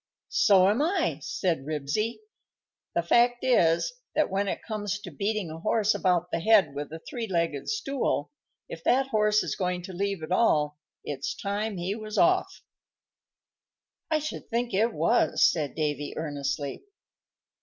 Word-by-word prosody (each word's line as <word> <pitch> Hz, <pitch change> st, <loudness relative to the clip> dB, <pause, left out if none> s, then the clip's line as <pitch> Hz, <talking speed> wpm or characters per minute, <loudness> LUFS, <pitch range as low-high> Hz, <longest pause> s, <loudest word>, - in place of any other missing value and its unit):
"So 190 Hz, -3 st, +5 dB
am 210 Hz, +7 st, +2 dB
I," 345 Hz, +6 st, 0 dB
said 170 Hz, -7 st, -1 dB
Ribsy. 155 Hz, -, -2 dB, 0.7 s
"The 170 Hz, -, +2 dB
fact 240 Hz, +7 st, +3 dB
is, 175 Hz, -, +3 dB, 0.2 s
that 310 Hz, -, +2 dB
when 200 Hz, +1 st, 0 dB
it -, -, -3 dB
comes 210 Hz, -2 st, -3 dB
to 190 Hz, -3 st, -9 dB
beating 200 Hz, +2 st, -2 dB
a 160 Hz, -, -7 dB
horse 215 Hz, +4 st, +2 dB
about 180 Hz, -2 st, +1 dB
the -, -, 0 dB
head 205 Hz, -5 st, +4 dB
with 145 Hz, +1 st, -5 dB
a 160 Hz, -, -5 dB
three 235 Hz, -2 st, -4 dB
legged 170 Hz, -6 st, -1 dB
stool, 275 Hz, -, -1 dB, 0.4 s
if 165 Hz, -, -9 dB
that 270 Hz, +1 st, +2 dB
horse 210 Hz, -2 st, +3 dB
is -, -, -3 dB
going 180 Hz, -1 st, -2 dB
to 185 Hz, -, -8 dB
leave 195 Hz, -2 st, -2 dB
at 155 Hz, -, -6 dB
all, 150 Hz, -8 st, +2 dB, 0.2 s
it's 140 Hz, -1 st, -4 dB
time 205 Hz, +1 st, -3 dB
he 180 Hz, +3 st, -2 dB
was 215 Hz, 0 st, -6 dB
off." 370 Hz, +2 st, +2 dB, 1.5 s
"I 315 Hz, -, +3 dB
should 310 Hz, 0 st, -5 dB
think 240 Hz, +1 st, -1 dB
it 220 Hz, +5 st, +2 dB
was," -, -, +2 dB
said 150 Hz, -4 st, -1 dB
Davy, 145 Hz, -2 st, -2 dB
earnestly. 145 Hz, -2 st, -3 dB
195 Hz, 155 wpm, -27 LUFS, 160-225 Hz, 1.5 s, So